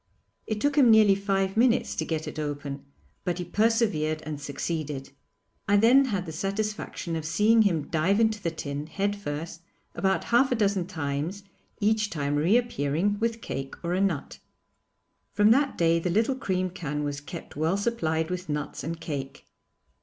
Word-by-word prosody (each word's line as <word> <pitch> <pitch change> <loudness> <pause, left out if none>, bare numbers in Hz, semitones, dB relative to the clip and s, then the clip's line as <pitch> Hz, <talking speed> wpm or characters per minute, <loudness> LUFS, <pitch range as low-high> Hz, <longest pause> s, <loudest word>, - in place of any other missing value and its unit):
It 215 -1 -2
took 290 +4 0
him 255 -4 +6
nearly 215 -3 +7
five 195 -1 0
minutes 240 +2 +3
to - - -2
get 160 -1 -3
it - - -6
open, 145 -2 -4 0.4
but 175 -1 -1
he 180 - -4
persevered 200 -7 +1
and 150 -2 -5
succeeded. 145 -1 -4 0.6
I 205 0 +4
then 245 +6 +6
had 200 -7 -2
the 160 - -6
satisfaction 195 -1 -3
of 160 - -3
seeing 210 +8 +4
him 170 -8 +1
dive 175 +6 +1
into 220 -2 +2
the 170 - 0
tin, 145 -2 -5
head 200 +5 -1
first, 165 -3 -6 0.3
about 190 0 0
half 250 +3 +3
a - - +3
dozen 200 -5 +1
times, 160 +2 -3 0.4
each 215 0 +2
time 145 -4 -2
reappearing 190 - +1
with 230 0 -1
cake 135 0 -5
or 170 +1 -1
a 185 - +1
nut. 180 -8 -1 0.9
From 210 +1 +5
that 275 +3 +3
day 165 0 +3
the 180 - -2
little 220 +9 +2
cream 185 -7 -1
can 150 -5 -4
was 145 -1 -3
kept 165 +3 -9
well 160 +5 +1
supplied 165 -7 -1
with 180 -2 -4
nuts 150 -1 -3
and 165 +2 -4
cake. 140 -4 -6
180 Hz, 170 wpm, -27 LUFS, 155-210 Hz, 0.9 s, nearly